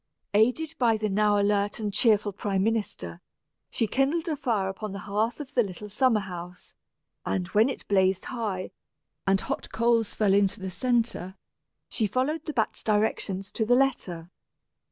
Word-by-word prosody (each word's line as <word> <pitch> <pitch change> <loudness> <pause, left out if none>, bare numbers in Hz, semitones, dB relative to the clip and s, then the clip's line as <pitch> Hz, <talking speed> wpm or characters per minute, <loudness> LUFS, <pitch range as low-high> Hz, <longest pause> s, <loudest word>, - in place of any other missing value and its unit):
Aided 250 +10 +2
by 230 -3 +3
the 215 0 -1
now 205 +1 +3
alert 205 +1 +1
and 210 -2 -2
cheerful 210 -1 +3
prime 195 -2 -1
minister, 205 - -2 0.5
she 225 - 0
kindled 280 - 0
a 315 - 0
fire 230 -9 0
upon 195 +1 -5
the - - -5
hearth 215 +5 -1
of 290 -1 -8
the 250 - +4
little 210 0 -5
summer 230 0 +2
house; 180 -2 -8 0.5
and 180 - -1
when 215 +6 +4
it 270 - -6
blazed 190 -2 +2
high, 210 -7 -3 0.6
and 195 0 +3
hot - - -4
coals 230 -1 +1
fell 205 -3 +3
into 200 +1 +2
the 190 -1 -5
centre, 230 -3 -1 0.5
she 220 - 0
followed 270 +9 -1
the 310 - -2
bat's 225 -5 0
directions 205 -2 0
to 220 - -1
the 245 +3 +4
letter. 185 -11 0
210 Hz, 165 wpm, -27 LUFS, 195-240 Hz, 0.6 s, the